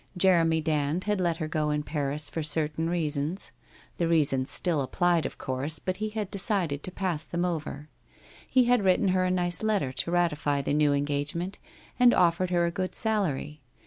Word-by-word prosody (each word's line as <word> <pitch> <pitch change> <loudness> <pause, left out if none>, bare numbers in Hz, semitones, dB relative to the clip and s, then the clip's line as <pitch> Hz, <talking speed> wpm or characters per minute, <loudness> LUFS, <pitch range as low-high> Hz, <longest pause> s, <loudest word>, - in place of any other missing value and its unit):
Jeremy 165 -3 +3
Dand 155 +2 -1
had 210 -2 -1
let 170 -2 0
her 155 -2 -3
go 155 -1 -1
in 150 0 -1
Paris 145 0 -2
for 165 - -4
certain 155 +1 +1
reasons; 160 +1 -1 0.5
the 170 - 0
reasons 145 -5 +3
still 170 -5 +2
ap 130 - -5
plied, 175 -3 +2
of - - -12
course, 135 +4 0
but 185 +5 -3
he 215 +1 -3
had 210 -2 -5
decided 185 -7 0
to 185 - -6
pass 180 -5 -2
them 175 +1 -2
over. 155 -4 -4 0.6
He 255 - +4
had 245 -3 +2
written 190 +1 +3
her 185 0 +1
a - - 0
nice 175 -2 0
letter 210 -11 0
to 130 - -3
ratify 150 -5 0
the 140 - -1
new 150 -1 +3
engage 145 +1 -1
ment 180 +4 -4 0.4
and 245 -1 +6
offered 175 +1 +2
her 175 -1 +1
a 170 - -1
good 185 +1 -4
salary. 160 - -1
165 Hz, 195 wpm, -27 LUFS, 150-185 Hz, 0.6 s, and